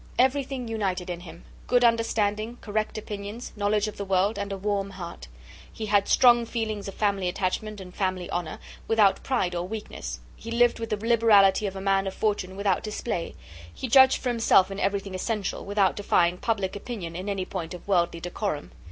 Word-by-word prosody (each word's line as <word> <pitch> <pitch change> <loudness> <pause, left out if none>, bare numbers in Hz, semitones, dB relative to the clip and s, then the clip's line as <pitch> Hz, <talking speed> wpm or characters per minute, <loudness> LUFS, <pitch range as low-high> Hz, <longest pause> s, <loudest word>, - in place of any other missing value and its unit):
Everything 265 -1 +1
united 190 -5 -2
in 175 - -5
him; 175 -1 -12 0.2
good 245 -1 +3
understanding, 230 -1 +1
correct 215 0 -2
opinions, 210 +2 -6
knowledge 210 0 +1
of 215 - -7
the 200 - -3
world, 195 +2 +1
and 200 0 -3
a 195 - -3
warm 200 0 -1
heart. 170 - -8 0.4
He 220 - -5
had 205 -1 +2
strong 240 -1 +6
feelings 220 -4 -3
of 195 - -7
family 200 -3 +1
attachment 200 +3 -2
and 180 -1 -10
family 185 -2 -2
honour, 175 -3 -3 0.3
without 215 -3 +4
pride 215 -9 0
or 175 0 -2
weakness; 215 +1 -6 0.2
he 230 - -9
lived 235 0 +3
with 225 0 -4
the 210 - 0
liberality 215 -3 +4
of 195 - -5
a 190 - -5
man 195 0 +2
of 190 - -4
fortune, 200 -3 -1
without 200 -2 +1
display; 210 -4 -4 0.4
he 260 - -5
judged 265 +2 +7
for 255 - 0
himself 225 -5 +4
in 195 - -5
everything 200 -1 -1
essential, 200 +1 -2
without 200 -1 +2
defying 180 -3 +2
public 200 -5 -1
opinion 200 -6 -6
in 185 +3 -4
any 195 -2 -2
point 180 -2 -5
of 175 - -13
worldly 170 -3 +1
decorum. 175 - -4
200 Hz, 185 wpm, -26 LUFS, 185-225 Hz, 0.4 s, judged